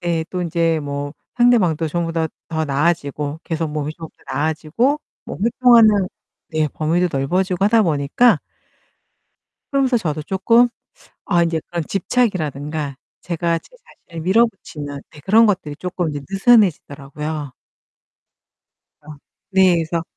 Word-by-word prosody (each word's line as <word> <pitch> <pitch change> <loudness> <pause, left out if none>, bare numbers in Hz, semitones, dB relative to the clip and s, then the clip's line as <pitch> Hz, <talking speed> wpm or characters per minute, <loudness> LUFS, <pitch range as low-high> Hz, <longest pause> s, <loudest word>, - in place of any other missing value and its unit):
네. 170 -2 -1
또 180 -1 -2
인제 165 -1 0
뭐 145 0 -4 0.2
상대방도 190 -10 +3
전보다 165 0 -1 0.2
더 160 -1 -1
나아지고 145 0 -1
계속 160 -1 -2
몸이 150 0 -3
좀 165 -1 -9
더 - - -10
나아지고 160 - 0 0.3
뭐 - - -7
활동하는 225 -4 +5 0.4
네 155 -2 0
범위도 170 +3 +1
넓어지고 180 +7 0
하다 220 +2 +4
보니까 160 - +3 1.3
그러면서 270 -2 +2
저도 155 -8 -2
쪼끔 230 +8 +3 0.6
아 175 -3 +3
이제 165 -1 0
그런 170 -2 -3
집착이라든가 155 - -1 0.2
제가 170 -1 -1
제 - - -22 0.4
자신을 165 -1 -7
밀어붙이는 180 -8 0
네 150 - -14
그런 215 +9 +5
것들이 180 -8 -1
쪼끔 180 0 -3
이제 145 -1 -5
느슨해지더라고요. 155 - +1 1.5
어 150 - -19 0.4
네, 190 -2 +5
그래서 165 +1 -2
165 Hz, 290 characters per minute, -20 LUFS, 150-195 Hz, 1.5 s, 활동하는